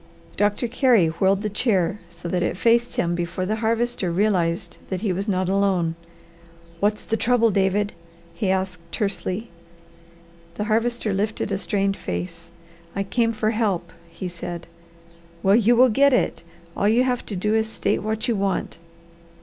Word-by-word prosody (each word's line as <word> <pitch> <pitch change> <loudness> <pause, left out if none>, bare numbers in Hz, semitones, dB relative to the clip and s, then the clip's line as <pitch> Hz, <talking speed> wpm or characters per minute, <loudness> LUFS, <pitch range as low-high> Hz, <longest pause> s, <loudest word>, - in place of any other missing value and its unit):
Doctor 205 +4 +1
Carey 235 - +4
whirled 190 +5 +1
the - - 0
chair 200 -4 +1
so 170 0 -9
that 180 +1 0
it 175 - -1
faced 235 +3 +2
him 175 0 +1
before 175 +1 -2
the 215 +3 -1
Harvester 230 -3 0
realized 175 -3 0
that 185 -2 -3
he 205 -4 0
was 195 +4 -3
not 185 -2 0
alone. 190 -4 +1 0.9
"What's 210 +2 +1
the 225 - -1
trouble, 230 -1 +3
David?" 200 +1 +1 0.4
he 185 +3 -1
asked 190 -2 -1
tersely. 195 +1 -3 1.0
The 210 - -2
Harvester 225 0 0
lifted 210 +1 -1
a 195 - 0
strained 195 0 0
face. 170 -1 -5 0.5
"I 200 - 0
came 230 +4 +1
for 215 -1 0
help," 195 -7 -1 0.2
he 170 +2 -6
said. 175 -1 -6 0.8
"Well 195 +1 +5
you 235 +1 +4
will 255 +2 +6
get 280 +5 +4
it! - - +1 0.3
All 205 - +2
you 235 +3 +4
have 250 -1 0
to 205 - -4
do 210 +4 0
is 220 0 +2
to 220 - -10
state - - 0
what 220 +3 -2
you 235 - +1
want." 195 -4 -2
200 Hz, 165 wpm, -23 LUFS, 185-225 Hz, 1.0 s, will